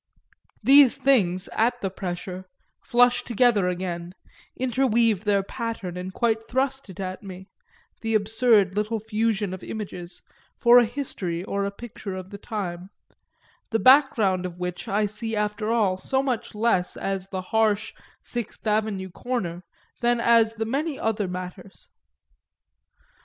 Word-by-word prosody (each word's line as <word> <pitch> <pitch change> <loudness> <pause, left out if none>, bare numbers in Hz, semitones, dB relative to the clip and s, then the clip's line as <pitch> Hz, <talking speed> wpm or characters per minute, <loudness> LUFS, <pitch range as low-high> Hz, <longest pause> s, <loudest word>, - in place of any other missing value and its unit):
These 275 -2 +7
things, 190 -9 +2
at 245 +2 +1
the 195 - -2
pressure, 180 0 -5 0.4
flush 245 0 +4
together 230 -4 +2
again, 175 -1 -4 0.4
interweave 235 -5 +2
their 200 -1 +2
pattern 225 -5 -5
and 180 +1 -5
quite 225 +2 0
thrust 265 0 -1
it 190 - -11
at 185 -1 -4
me, 190 -1 -10 0.5
the 225 -1 0
absurd 215 -2 +3
little 215 +2 -1
fusion 215 -2 -1
of 185 - -7
images, 185 -5 -7 0.3
for 240 0 +7
a 240 - +4
history 205 -9 -4
or 200 0 -2
a - - -1
picture 200 -2 -8
of 185 0 -8
the 200 - -8
time 190 -5 -5 0.8
the 225 - +1
background 225 -9 +4
of 175 -1 -10
which 180 0 -5
I 210 +2 +1
see 215 +2 -3
after 210 +1 -1
all 210 -5 +2
so 265 +6 0
much 250 -5 -3
less 210 -5 +1
as 195 -1 -3
the 190 -1 -4
harsh 220 -2 +2 0.3
Sixth 240 -3 -6
Avenue 210 -3 0
corner 180 -6 -3 0.4
than 240 0 +2
as 230 -1 +4
many 270 +7 -2
other 215 -3 -1
matters. 180 +1 -8
210 Hz, 140 wpm, -25 LUFS, 185-235 Hz, 0.8 s, These